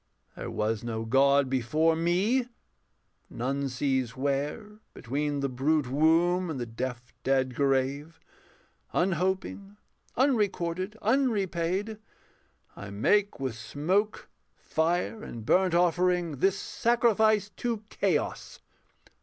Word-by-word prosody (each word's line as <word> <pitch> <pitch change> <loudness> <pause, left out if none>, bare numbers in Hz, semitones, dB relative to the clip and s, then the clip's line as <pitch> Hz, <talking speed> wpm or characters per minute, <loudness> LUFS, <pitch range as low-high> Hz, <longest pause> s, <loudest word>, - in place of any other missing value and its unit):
There - - -6
was 110 +1 -1
no 115 -1 -3
God 140 +3 +4
before 150 +6 +1
me: 190 +10 +1 0.8
none 135 +3 -2
sees 130 -2 -1
where, 145 - -2 0.2
Between 145 +3 -2
the 140 - +1
brute 135 +1 0
womb 170 +5 +3
and 150 -5 -4
the 120 - -2
deaf, 120 +1 -6
dead 130 -1 +1
grave, 140 +4 0 0.7
Unhoping, 190 +3 -1 0.4
unrecorded, 205 -6 0
unrepaid, 205 -4 0 0.8
I 100 - -8
make 200 - +1
with 130 -3 -2
smoke, 175 - -1 0.3
fire, 175 +7 -1
and 115 -2 -8
burnt 185 +4 +3
offering 175 -2 +2
This 195 +7 +2
sacrifice 220 -3 +2
to 230 -3 -2
Chaos. - - -1
160 Hz, 105 wpm, -28 LUFS, 135-195 Hz, 0.8 s, God